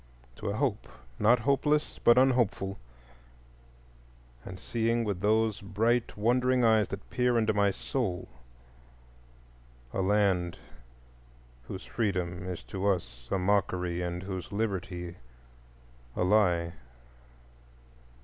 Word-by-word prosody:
—to 105 - -4
a 100 - -2
hope 125 -4 -1 0.3
not 120 +3 +4
hopeless 145 +4 +1
but 120 - +6
unhopeful, 120 -7 +2 1.6
and 95 0 -8
seeing 115 +3 0
with 100 -5 -2
those 110 0 +2
bright 115 +5 0
wondering 125 +3 +2
eyes 110 -2 +4
that 100 0 -7
peer 125 -1 +2
into 110 -1 +2
my 100 -1 +3
soul 100 -3 -3 1.7
a 95 - 0
land 95 -3 +2 1.1
whose 95 - -7
freedom 90 -5 -2
is 85 -8 -5
to 95 +11 -3
us 60 -11 -2
a - - +1
mockery 90 -2 0
and 90 +1 -3
whose 95 -1 -6
liberty 95 -4 -3 1.0
a - - 0
lie. 90 -4 +3
100 Hz, 110 wpm, -29 LUFS, 90-115 Hz, 1.7 s, but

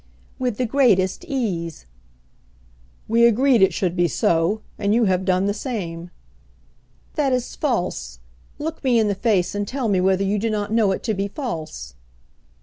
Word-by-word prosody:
"With 250 -4 -1
the 255 - 0
greatest 225 - +2
ease." 190 - -3 1.2
"We 235 +2 +5
agreed 245 0 +3
it 190 0 +5
should 175 +1 -1
be 175 -1 +2
so; 170 +6 +1 0.2
and 205 +1 +1
you 235 - +3
have 185 -1 +1
done 185 0 +2
the 200 - +1
same." 180 -8 -5 1.0
"That 285 -3 +1
is 250 -1 -2
false. 180 - -2 0.4
Look 315 +2 -5
me 250 -3 +3
in 220 -2 +3
the - - +1
face 195 -3 +1
and 205 0 -2
tell 260 0 -2
me 190 -3 +2
whether 190 +1 +2
you 200 +1 0
do 225 +3 -1
not 210 0 -2
know 220 -4 +3
it 190 - -3
to 220 - 0
be 195 0 -2
false!" 160 - -6
205 Hz, 170 wpm, -22 LUFS, 185-240 Hz, 1.2 s, We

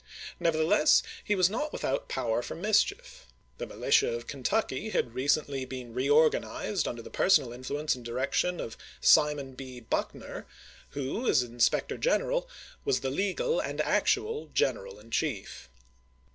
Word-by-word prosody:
Never 165 -2 +1
theless, 155 -1 +4 0.2
he 210 - +1
was 185 -2 +4
not 295 +10 -2
without - - -2
power 115 0 0
for - - -6
mischief. 400 - 0 0.3
The - - -4
militia 430 - +2
of 475 - -4
Kentucky - - -1
had 480 - -1
recently 140 0 0
been 130 -2 -7
reor 145 +5 +5
ganized 200 -3 -2
under 120 -1 -5
the - - -11
personal 145 -11 +3
influence 140 +5 -2
and 125 - -8
direction 130 +9 -1
of 115 - -6 0.2
Simon 145 -3 +4
B. 130 -1 -9
Buckner, 115 - -4 0.5
who, 145 - -2
as 130 - +4
inspector 120 -1 0
general, - - +1 0.3
was 415 - +1
the 130 - -2
legal 205 - 0
and - - -4
actual 445 +1 +1
general 485 -2 0
in - - -17
chief. 100 - -3
150 Hz, 145 wpm, -29 LUFS, -, 0.5 s, reor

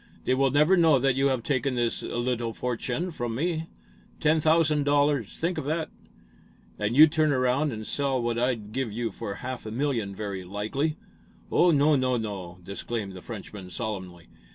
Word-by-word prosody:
They - - +2
will 135 +1 +3
never 150 +7 +4
know 165 -5 +5
that 135 +1 +2
you 135 +1 +3
have 130 -4 0
taken 135 -1 0
this 120 -1 0
little 120 -1 -2
fortune 125 +9 -2
from 120 -6 -3
me. 165 +3 -1 0.5
Ten 155 +1 +3
thousand 155 -1 +3
dollars! 145 -5 +1
Think 170 +2 -1
of - - -5
that!" 160 +2 -2 0.9
"And 105 +3 0
you'd 155 +2 +8
turn 155 -1 +2
around 130 +3 +2
and 110 -2 -6
sell 140 0 0
what 120 -1 -1
I'd, 120 -4 -1
give 130 -2 -2
you 115 +2 -2
for 100 - -5
a - - -10
half 130 -3 -5
a - - -5
million, 115 -6 -1
very 100 -2 -4
likely." 110 - -2 0.5
"Oh, 180 - +5
no, 150 -1 +4
no, 130 -2 +1
no!" 95 -6 -5
disclaimed 100 +2 -4
the 95 - -9
Frenchman, 100 -3 -8
solemnly. 95 -5 -5
125 Hz, 180 wpm, -27 LUFS, 110-145 Hz, 0.9 s, you'd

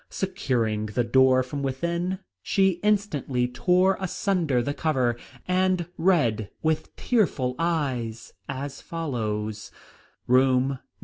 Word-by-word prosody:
Securing 120 - -1
the 120 +4 0
door 130 +2 +4
from 140 +3 -5
within, 170 +7 -1 0.2
she 190 - +2
instantly 155 -12 +1
tore 180 +8 +2
asunder 180 - 0
the 140 +4 -1
cover, 130 -7 +1 0.3
and 185 -1 +2
read 125 - +2
with 160 -1 -1
tearful 170 - +1
eyes 130 -9 -2 0.2
as 140 +1 -5
follows: 110 -9 -3 0.6
"Room 130 +1 +4
No. 135 - -3
140 Hz, 110 wpm, -25 LUFS, 125-180 Hz, 0.6 s, door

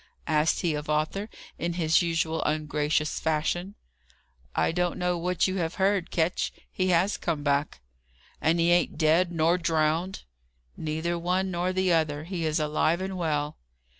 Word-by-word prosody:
asked 155 0 +2
he 170 -3 +1
of 150 0 -5
Arthur, 155 +8 -1 0.3
in 170 0 -1
his 165 -1 +3
usual 165 -1 0
ungracious 150 0 0
fashion. 175 +5 -1 0.8
"I 80 - +2
don't 175 +1 0
know 180 0 0
what 180 +1 +1
you 185 - -2
may 190 - -1
have 165 0 -2
heard, 195 -2 +1
Ketch. 170 +1 0 0.2
He 185 - 0
has 185 +3 +2
come 160 -4 -2
back." 145 - 0 0.6
"And 165 +2 +2
he 170 +1 +3
ain't 175 -2 +2
dead 165 +3 +3
nor 170 +2 +2
drownded?" 165 +2 0 0.5
"Neither 160 +2 -2
one 185 +2 0
nor 175 +1 0
the 185 -1 +2
other. 155 -2 +1
He 170 -1 -3
is 155 +1 0
alive 155 +2 +1
and 190 0 -4
well." 150 -4 -1
165 Hz, 165 wpm, -27 LUFS, 155-180 Hz, 0.8 s, his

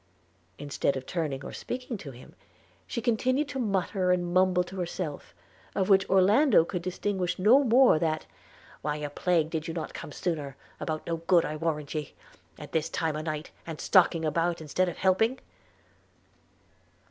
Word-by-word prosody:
– 90 -1 -38
Instead 140 -1 0
of 130 - -7
turning 150 -6 -3
or - - -7
speaking 250 -1 -5
to 170 -8 -8
him, 125 -1 -13 0.5
she 235 - -4
continued 255 +5 +1
to 275 -2 -5
mutter 195 -4 0
and 175 -1 0
mumble 185 -1 +4
to 190 +2 -10
herself, 175 -4 -5 0.4
of 190 0 0
which 190 -1 +4
Orlando 195 - +5
could 180 0 -4
distinguish 185 0 -2
no 230 +9 +5
more 245 - +5
that, 155 -1 -1 0.6
'Why 150 0 -1
a 150 -1 -5
plague 165 0 +1
did 160 0 -3
not 160 -2 -3
you - - -16
come - - -8
sooner? 145 -5 -3 0.2
about 155 -1 -3
no 165 -1 -2
good, 170 +1 +3
I 155 - -3
warrant 155 -2 -2
ye... 150 -3 -5 0.4
at - - -10
this 160 -1 0
time 160 -2 -1
o'night! 155 0 -4 0.2
and 160 -2 -6
stalking 175 -4 +3
about 170 +2 0
instead 170 +4 0
of 175 - -8
helping 220 +7 +2
175 Hz, 170 wpm, -28 LUFS, 155-190 Hz, 0.6 s, Orlando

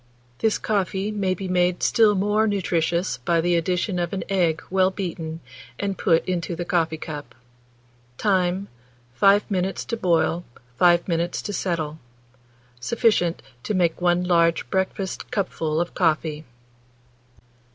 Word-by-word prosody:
This 220 -1 +2
coffee 200 0 -1
may 195 -3 0
be 190 +1 -5
made 180 0 +1
still 215 -2 +4
more 210 +3 +2
nutritious 175 -3 0
by 170 -2 +1
the 175 +1 +2
addition 180 +3 0
of 175 +1 -2
an 195 - -2
egg 170 -4 +1
well 190 0 +4
beaten, 165 -4 -5 0.4
and 200 -1 -2
put 165 -5 +2
into 175 -1 -2
the 175 +1 -4
coffee 165 -4 0
cup. 145 -6 -8 0.8
Time. 190 -1 +1 0.5
5 200 - +4
minutes 190 0 -1
to 230 - -2
boil, 175 -4 +1 0.4
5 175 -1 +4
minutes 170 0 -1
to 205 - -4
settle. 160 -5 -2 0.8
Sufficient 180 - +1 0.2
to 210 - -2
make 175 -2 +1
1 175 0 +2
large 170 -2 +2
breakfast 190 0 -2
cupful 165 -8 -1
of 175 0 -2
coffee. 155 -2 0
180 Hz, 135 wpm, -23 LUFS, 170-195 Hz, 0.8 s, still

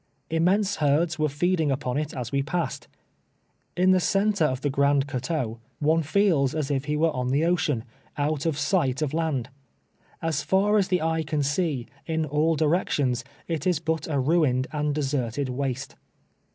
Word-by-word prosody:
Immense 190 +5 +2
herds 155 +3 +1
were 155 0 +2
feeding 160 +2 +1
upon 130 -2 -1
it 150 +1 -1
as 125 -3 -5
we 140 0 +1
passed. 155 0 -3 0.9
In 185 +1 +4
the 185 - +5
centre 200 -1 +2
of 130 -2 -1
the 145 - 0
Grand 140 0 +3
Coteau 130 -4 -3 0.2
one 160 +2 +2
feels 160 -4 +2
as 150 -2 -1
if 135 0 -1
he 150 0 -1
were 160 +1 +3
on 125 0 -1
tlie 145 +5 +2
ocean, 160 -9 +1 0.3
out 150 +1 0
of 155 -3 0
sight 150 -4 +1
of 150 - -2
land. 155 -7 -1 0.7
As 160 -3 -1
far 205 +2 +2
as 195 - +1
the 180 -3 +1
eye 160 0 +1
can 150 -1 -1
see, 145 -3 0 0.2
in 160 -1 0
all 155 +3 +1
directions, 150 -5 +1 0.2
it 165 -1 -2
is 180 -3 +3
but 160 -1 -2
a 150 -3 -1
ruined 135 -3 +2
and 150 -1 -1
deserted 135 -2 -1
waste. 135 0 -3
150 Hz, 175 wpm, -25 LUFS, 140-165 Hz, 0.9 s, the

